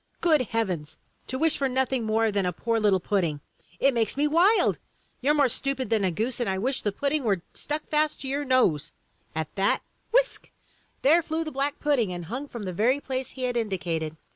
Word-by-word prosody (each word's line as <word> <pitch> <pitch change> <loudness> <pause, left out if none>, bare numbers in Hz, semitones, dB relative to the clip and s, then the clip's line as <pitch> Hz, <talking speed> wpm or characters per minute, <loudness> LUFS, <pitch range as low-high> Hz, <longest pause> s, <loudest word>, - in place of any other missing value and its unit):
Good 315 -5 +4
heavens, 185 -10 -2 0.3
to 260 - -3
wish 320 +2 +2
for 275 -1 0
nothing 260 -2 0
more 220 0 +2
than 200 -2 0
a - - +1
poor 230 +6 -1
little 205 -3 +3
pudding! 175 -6 0 0.4
It 275 0 +4
makes 230 +1 0
me 295 +1 +3
wild! 355 +8 +4 0.4
You're 290 +4 +3
more 285 -2 +4
stupid 260 -1 -2
than 220 -3 +2
a 190 - +3
goose, 225 +9 -2
and 240 -4 0
I 190 - 0
wish 255 +7 0
the 205 - 0
pud 280 +7 -1
ding 305 -2 0
were 195 -7 0
stuck 300 +1 -3
fast 305 0 0
to 270 - -4
your 280 +2 -1
nose!" 255 - +2 0.4
At 160 -1 -3
that 195 0 +1
— - - -42
^whisk! - - +2 0.6
there 320 +5 +6
flew 320 0 -2
the 310 - -5
black 280 +1 -2
pudding 265 -10 +1
and 175 -1 -5
hung 255 - -5
from 235 -5 -7
the 185 -2 -4
very 240 +9 +2
place 260 -2 -4
he 260 - -7
had 250 -1 0
indicated. 170 -8 -2
250 Hz, 215 wpm, -26 LUFS, 195-285 Hz, 0.6 s, there